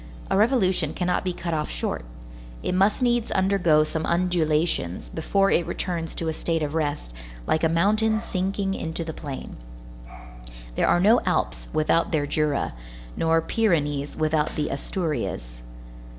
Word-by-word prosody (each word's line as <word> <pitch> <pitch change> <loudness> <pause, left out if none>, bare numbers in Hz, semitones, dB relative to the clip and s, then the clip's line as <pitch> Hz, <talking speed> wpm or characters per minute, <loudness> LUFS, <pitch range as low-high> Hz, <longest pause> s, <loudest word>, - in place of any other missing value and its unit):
A - - +3
revolution 210 -3 +2
cannot 180 -1 0
be 185 - -1
cut 170 -1 -4
off 150 -1 -1
short. - - -3 0.6
It - - -1
must 195 +6 +2
needs 240 -2 +2
undergo 190 -5 +3
some 160 +1 -3
undulations 165 - 0
before 195 +5 +1
it 170 - +2
returns 170 -3 -3
to 165 - -3
a 160 - 0
state 165 0 -1
of 145 0 -3
rest, 145 - -2 0.3
like 160 - +1
a 165 - +4
mountain 215 +6 +2
sinking 195 -1 -2
into 165 -2 -4
the 160 -1 -5
plain. 140 -3 -7 1.2
There - - +1
are - - +4
no 215 +6 +5
Alps - - 0
without 155 +2 +2
their 150 -3 +1
Jura, 150 -1 0 0.4
nor 165 0 +2
Pyrenees 145 -10 0
without 155 -1 +1
the 150 - -1
Asturias. 115 - -3
165 Hz, 150 wpm, -25 LUFS, 150-190 Hz, 1.2 s, no